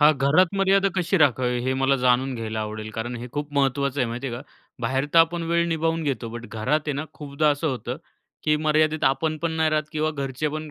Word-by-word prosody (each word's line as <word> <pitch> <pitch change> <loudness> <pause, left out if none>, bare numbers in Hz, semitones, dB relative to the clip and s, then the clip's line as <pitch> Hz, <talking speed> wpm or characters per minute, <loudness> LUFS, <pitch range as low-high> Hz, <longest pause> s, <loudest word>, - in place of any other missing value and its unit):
हां. 150 +1 +7
घरात 160 +7 +4
मर्यादा 195 0 +4
कशी 180 +1 +1
राखावी, 125 -3 +2
हे 130 - +1
मला 135 +1 +3
जाणून 125 +1 +3
घ्यायला 110 -2 -4
आवडेल, 110 0 -5
कारण 120 +3 -4
हे 120 +1 -6
खूप 145 0 -4
महत्त्वाचं 140 0 +1
आहे. 125 - +2
माहिती 120 +4 -4
आहे 120 - -3
का, 125 - -8 0.4
बाहेर 130 +4 0
तर - - +8
आपण 165 +1 +3
वेळ 170 0 +2
निभावून 165 0 0
घेतो. 130 -6 -2
बट 120 0 -8
घरात 125 +8 0
आहे 150 - 0
ना, 140 +2 -3
खूपदा 150 +1 -1
असं 145 +3 -1
होतं, 125 -5 -4 0.5
की 150 0 +3
मर्यादेत 155 0 +1
आपण 155 +4 +1
पण 170 -1 0
नाही 160 -1 +1
राहत 155 0 -1
किंवा 155 0 0
घरचे 140 0 -3
पण 155 +1 -5
145 Hz, 225 wpm, -24 LUFS, 125-155 Hz, 0.5 s, तर